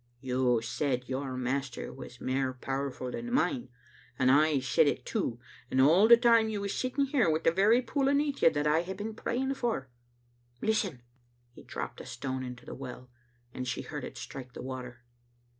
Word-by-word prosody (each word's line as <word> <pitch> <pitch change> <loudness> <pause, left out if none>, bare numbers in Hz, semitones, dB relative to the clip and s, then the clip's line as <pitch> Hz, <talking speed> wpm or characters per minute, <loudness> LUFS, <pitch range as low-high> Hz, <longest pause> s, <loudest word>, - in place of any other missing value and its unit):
" - - -40
You 125 -2 +1
said 125 -1 -1
your 130 0 -3
master 130 0 -3
was 125 -1 -10
mair 130 0 -1
powerful 135 0 -4
than 240 - -5
mine, 265 -1 +1 0.5
and 130 0 +4
I 150 +1 +4
said 130 +3 +3
it - - -1
too, 150 - -2 0.3
and 130 - +1
all 165 +10 +6
the 235 0 +9
time 230 -2 +5
you 210 -2 -2
was 200 0 -2
sitting 260 +2 0
here 265 - +2
wi' 155 - +3
the - - +5
very 210 +8 +4
pool 275 +1 0
aneath 285 0 +1
you - - +8
that 145 -1 -1
I 150 +2 +3
have 190 +2 -6
been 215 +2 -4
praying 260 +4 -1
for. 225 - -2 0.7
Listen 195 - 0 0.2
!" 120 0 -39
He - - -13
dropped - - -6
a - - -10
stone 130 +1 -4
into 125 -1 -8
the - - -7
well, 125 -1 -9 0.4
and 125 0 -4
she 125 - -2
heard - - -6
it - - -7
strike 125 - -8
the - - -7
water. 125 -2 -7
140 Hz, 195 wpm, -30 LUFS, -, 0.7 s, the